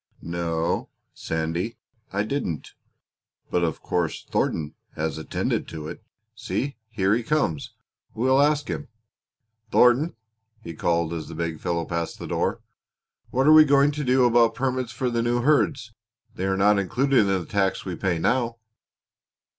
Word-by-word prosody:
"No, 85 Hz, -1 st, -1 dB, 0.2 s
Sandy, 80 Hz, +7 st, -3 dB, 0.3 s
I 100 Hz, +1 st, 0 dB
didn't; 110 Hz, -, -3 dB, 0.8 s
but 90 Hz, -, +1 dB
of 80 Hz, -3 st, -2 dB
course 85 Hz, -3 st, -1 dB
Thornton 75 Hz, -2 st, 0 dB, 0.2 s
has 80 Hz, 0 st, -2 dB
attended 80 Hz, -, -2 dB
to 80 Hz, -2 st, -7 dB
it. -, -, -8 dB, 0.3 s
See, 135 Hz, +5 st, -3 dB
here 100 Hz, -3 st, +1 dB
he 120 Hz, -, +1 dB
comes. 115 Hz, -, -1 dB, 0.4 s
We 115 Hz, -, -1 dB
will 130 Hz, +1 st, +5 dB
ask 150 Hz, 0 st, +2 dB
him. 150 Hz, -, -4 dB, 0.8 s
Thornton," 125 Hz, +8 st, +4 dB, 0.5 s
he 85 Hz, -, -7 dB
called, 85 Hz, 0 st, 0 dB
as 80 Hz, -2 st, -5 dB
the -, -, -8 dB
big 80 Hz, -1 st, -3 dB
fellow 85 Hz, -1 st, -1 dB
passed 85 Hz, -1 st, -3 dB
the -, -, -7 dB
door, -, -, -1 dB, 0.7 s
"what 130 Hz, +2 st, +1 dB
are 155 Hz, -, +8 dB
we 155 Hz, 0 st, +10 dB
going 140 Hz, 0 st, +4 dB
to 150 Hz, 0 st, -4 dB
do 130 Hz, -1 st, +4 dB
about 120 Hz, -1 st, +4 dB
permits 130 Hz, -2 st, -1 dB
for 125 Hz, +2 st, -2 dB
the 115 Hz, -1 st, 0 dB
new 120 Hz, +1 st, +1 dB
herds? 140 Hz, -5 st, +2 dB, 0.4 s
They 95 Hz, -, -3 dB
are 95 Hz, 0 st, +1 dB
not 100 Hz, +1 st, +4 dB
included 130 Hz, +7 st, +2 dB
in 105 Hz, -, +4 dB
the 95 Hz, -3 st, 0 dB
tax 95 Hz, -2 st, 0 dB
we 95 Hz, -, -3 dB
now 95 Hz, +8 st, +1 dB
pay." -, -, -32 dB
105 Hz, 160 wpm, -25 LUFS, 85-130 Hz, 0.8 s, we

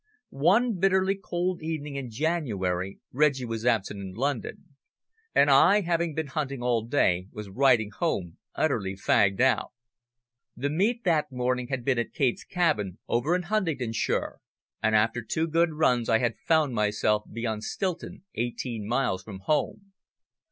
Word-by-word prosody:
One 195 Hz, -, +2 dB
bitterly 190 Hz, +1 st, +3 dB
cold 180 Hz, -2 st, -3 dB
evening 155 Hz, -3 st, -4 dB
in 135 Hz, -3 st, -4 dB
January 105 Hz, -, -2 dB
Reggie 140 Hz, -2 st, +2 dB
was 115 Hz, 0 st, -3 dB
absent 105 Hz, -4 st, +1 dB
in 95 Hz, -1 st, -7 dB
London, 140 Hz, -, -3 dB, 0.6 s
and 140 Hz, 0 st, +5 dB
I, 195 Hz, +10 st, +6 dB
having 170 Hz, -3 st, -1 dB
been 160 Hz, -, -1 dB
hunting 140 Hz, -3 st, -4 dB
all 120 Hz, -2 st, +1 dB
day, 95 Hz, -9 st, +2 dB
was 105 Hz, -2 st, -8 dB
riding 120 Hz, -3 st, +3 dB
home 95 Hz, -, -2 dB, 0.2 s
utterly 105 Hz, -11 st, 0 dB
fagged 95 Hz, 0 st, +2 dB
out. 130 Hz, +1 st, +2 dB, 0.8 s
The 140 Hz, +3 st, -1 dB
meet 220 Hz, +9 st, +1 dB
that 160 Hz, -6 st, +1 dB
morning 125 Hz, 0 st, -1 dB
had 130 Hz, -2 st, -4 dB
been 130 Hz, -3 st, +2 dB
at 120 Hz, -, -3 dB
Kate's 130 Hz, -4 st, 0 dB
Cabin, 150 Hz, -, 0 dB
over 140 Hz, +9 st, +1 dB
in 180 Hz, -, -1 dB
Huntingdonshire, 165 Hz, -, -1 dB, 0.4 s
and 110 Hz, 0 st, +2 dB
after 115 Hz, +3 st, +2 dB
two 160 Hz, +8 st, -1 dB
good 165 Hz, 0 st, +2 dB
runs 125 Hz, -6 st, +2 dB
I 110 Hz, -, +5 dB
had 120 Hz, 0 st, 0 dB
found 155 Hz, -5 st, +3 dB
myself 105 Hz, 0 st, +1 dB
beyond 110 Hz, -2 st, -3 dB
Stilton, 185 Hz, +5 st, -4 dB
eighteen 120 Hz, -2 st, -3 dB
miles 100 Hz, -7 st, 0 dB
from 95 Hz, -1 st, -10 dB
home. 195 Hz, -, -1 dB
130 Hz, 150 wpm, -27 LUFS, 110-160 Hz, 0.8 s, I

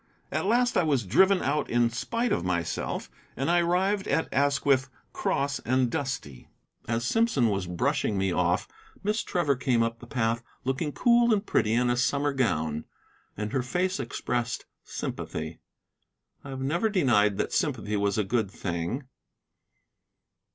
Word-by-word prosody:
At -, -, -1 dB
last 245 Hz, +3 st, +3 dB
I -, -, +5 dB
was 140 Hz, -, +1 dB
driven 190 Hz, -, +4 dB
out 145 Hz, +2 st, 0 dB
in 120 Hz, 0 st, +2 dB
spite 230 Hz, -, -1 dB
of -, -, +1 dB
myself, 85 Hz, -2 st, -2 dB, 0.3 s
and 135 Hz, +6 st, 0 dB
I 175 Hz, -, +4 dB
arrived 190 Hz, +4 st, +1 dB
at 160 Hz, -, 0 dB
Asquith 140 Hz, -1 st, +2 dB, 0.2 s
cross 140 Hz, 0 st, 0 dB
and 130 Hz, 0 st, +1 dB
dusty. 130 Hz, -, -4 dB, 0.4 s
As 115 Hz, +1 st, -1 dB
Simpson 185 Hz, -, +2 dB
was 100 Hz, -3 st, -1 dB
brushing 90 Hz, +3 st, 0 dB
me 95 Hz, -1 st, +1 dB
off, -, -, +1 dB, 0.4 s
Miss 210 Hz, +3 st, +1 dB
Trevor 155 Hz, -6 st, +1 dB
came 125 Hz, -2 st, +2 dB
up 115 Hz, 0 st, -2 dB
the 120 Hz, -, -12 dB
path 115 Hz, -2 st, 0 dB, 0.2 s
looking 135 Hz, +4 st, -1 dB
cool 235 Hz, -, +4 dB
and 210 Hz, -1 st, +2 dB
pretty 110 Hz, -, +1 dB
in 120 Hz, +1 st, +2 dB
a -, -, +2 dB
summer 140 Hz, +3 st, +1 dB
gown, 80 Hz, -, 0 dB, 0.5 s
and 105 Hz, 0 st, -4 dB
her 135 Hz, -, +2 dB
face 180 Hz, +7 st, -1 dB
expressed 120 Hz, -2 st, -2 dB, 0.2 s
sympathy. 80 Hz, +1 st, -5 dB, 0.8 s
I 140 Hz, -, -9 dB
have 135 Hz, -1 st, -5 dB
never 170 Hz, +11 st, +1 dB
denied 120 Hz, -, +3 dB
that -, -, -2 dB
sympathy 105 Hz, 0 st, 0 dB
was 100 Hz, 0 st, +1 dB
a 105 Hz, -, +2 dB
good 110 Hz, 0 st, 0 dB
thing. 90 Hz, -, -3 dB
130 Hz, 155 wpm, -27 LUFS, 110-160 Hz, 0.8 s, I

